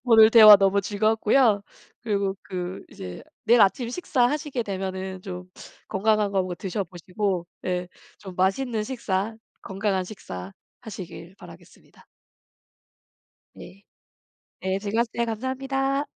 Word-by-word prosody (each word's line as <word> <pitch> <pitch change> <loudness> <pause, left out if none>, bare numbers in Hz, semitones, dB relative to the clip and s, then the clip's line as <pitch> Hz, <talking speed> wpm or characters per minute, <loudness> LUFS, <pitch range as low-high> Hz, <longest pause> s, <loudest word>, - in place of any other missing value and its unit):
오늘 225 -2 +7
대화 215 -3 +10
너무 195 0 +2
즐거웠고요. 215 +2 +2 0.4
그리고 200 -3 -1
그 180 0 -6
이제 90 -1 -9 0.2
내일 235 +1 +5
아침 230 +5 +3
식사 260 -1 -1
하시게 295 -4 -2
되면은 190 -2 -5
좀 180 -1 -7 0.4
건강한 215 0 +1
거 195 -1 +1
뭐 180 -1 -4
드셔 190 +3 -3
보시고 180 +1 -3 0.2
네 180 -1 -2 0.3
좀 190 -3 -10
맛있는 215 +4 0
식사 220 -4 -2 0.3
건강한 195 -1 -1
식사 95 - -8 0.3
하시길 185 -4 -9
바라겠습니다. - - -16 1.5
네. 195 +2 -13 0.8
네. 190 0 -1
즐거웠어요. 225 +3 -1
감사합니다. 270 +4 -2
200 Hz, 270 characters per minute, -25 LUFS, 185-230 Hz, 1.5 s, 대화